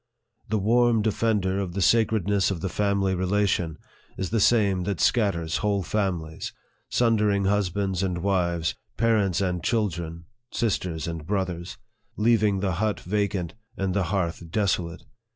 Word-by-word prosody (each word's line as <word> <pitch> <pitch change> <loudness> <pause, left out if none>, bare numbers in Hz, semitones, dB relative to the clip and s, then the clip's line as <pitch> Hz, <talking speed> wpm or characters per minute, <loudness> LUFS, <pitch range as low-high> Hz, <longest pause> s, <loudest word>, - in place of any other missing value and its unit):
The 110 - +1
warm 115 +2 +3
defender 105 -3 +1
of 95 -3 -3
the 100 - -2
sacredness 105 -2 +3
of 90 -5 -3
the 95 - -2
family 100 -1 +1
relation 95 -3 0 0.4
is 95 -1 -3
the 115 - +2
same 100 -4 +3
that 100 -4 -2
scatters 90 -9 +1
whole 100 -2 0
families, 85 -5 -2 0.4
sundering 105 -4 +2
husbands 95 -1 0
and 90 -2 -1
wives, 85 -5 +1 0.2
parents 105 -5 +2
and 90 -3 -1
children, 85 -7 -1 0.3
sisters 90 -8 -1
and 80 -2 -5
brothers, 95 -3 -2 0.4
leaving 105 -3 +3
the 100 -2 0
hut 105 +4 -1
vacant, 100 -3 -1 0.2
and 95 -1 -1
the 100 -2 +1
hearth 85 -3 -2
desolate. 90 -2 -1
95 Hz, 135 wpm, -25 LUFS, 90-105 Hz, 0.4 s, warm